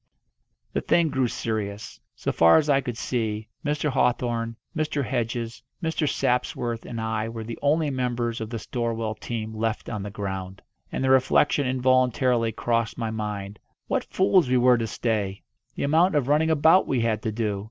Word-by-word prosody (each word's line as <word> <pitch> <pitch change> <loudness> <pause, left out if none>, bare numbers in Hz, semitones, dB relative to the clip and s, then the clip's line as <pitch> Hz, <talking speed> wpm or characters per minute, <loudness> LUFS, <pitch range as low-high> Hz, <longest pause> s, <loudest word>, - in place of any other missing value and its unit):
The - - 0
thing 170 -2 +3
grew 130 -3 +1
serious. 105 -2 -4 0.2
So - - -2
far 85 0 +6
as 155 -2 +2
I 140 0 +4
could 120 -3 -5
see, 110 -4 -2
Mr. 150 0 0
Hawthorn, 120 -3 0 0.2
Mr. 150 -3 -1
Hedges, 120 -2 -3 0.2
Mr. 160 -2 0
Sapsworth, 120 -2 -1
and 115 - -5
I 110 0 -2
were 115 -1 -6
the 115 +1 -7
only 150 +1 +2
members 120 -3 -2
of 110 - -4
the 115 - -4
Storwell 115 0 -2
team 110 -2 -4
left 110 0 -2
on 110 -3 -3
the 105 - -5
ground. 95 -2 -5 0.3
And - - -2
the 130 - +3
reflection 130 +1 +3
involuntarily 125 -2 +2
crossed 115 0 -1
my 115 -2 -2
mind 105 -2 -4 0.3
what - - 0
fools 185 -6 +3
we 130 - +3
were 125 0 +5
to 115 - -1
stay! 105 -4 -2 0.3
The - - -3
amount 160 +4 +3
of 140 -4 +1
running 155 +3 +3
about 160 +4 +5
we 130 -3 +1
had 110 -2 0
to 110 - -2
do! 105 -2 -1
120 Hz, 175 wpm, -25 LUFS, 110-130 Hz, 0.3 s, far